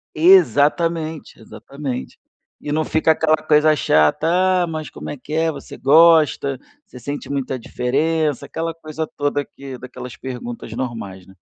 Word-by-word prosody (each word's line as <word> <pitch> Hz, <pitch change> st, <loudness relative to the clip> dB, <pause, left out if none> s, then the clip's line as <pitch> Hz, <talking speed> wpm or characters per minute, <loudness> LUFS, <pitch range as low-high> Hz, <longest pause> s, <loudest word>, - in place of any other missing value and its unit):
Exatamente, 165 Hz, -, +3 dB
exatamente. 140 Hz, -3 st, -7 dB, 0.4 s
E 145 Hz, -, -6 dB
não 155 Hz, +1 st, +1 dB
fica 160 Hz, +1 st, +2 dB
aquela 155 Hz, 0 st, +3 dB
coisa 155 Hz, 0 st, +3 dB
chata: 75 Hz, -, +2 dB, 0.4 s
"Ah, -, -, -2 dB
mas 155 Hz, -2 st, -5 dB
como -, -, -9 dB
é 145 Hz, -, -6 dB
que 140 Hz, +4 st, -9 dB
é? 160 Hz, +1 st, +1 dB
Você 145 Hz, -, -10 dB
gosta? 150 Hz, -3 st, +4 dB, 0.3 s
Você 125 Hz, -, -13 dB
sente 145 Hz, +4 st, -6 dB
muita 135 Hz, -2 st, -2 dB
diferença?" 150 Hz, +5 st, -1 dB
Aquela 165 Hz, 0 st, -4 dB
coisa 160 Hz, -1 st, -5 dB
toda 145 Hz, 0 st, 0 dB
aqui 135 Hz, -2 st, -10 dB
daquelas 125 Hz, 0 st, -9 dB
perguntas 120 Hz, -3 st, -7 dB
normais, 115 Hz, -7 st, -6 dB
né. 95 Hz, -, -17 dB
145 Hz, 145 wpm, -20 LUFS, 125-160 Hz, 0.4 s, gosta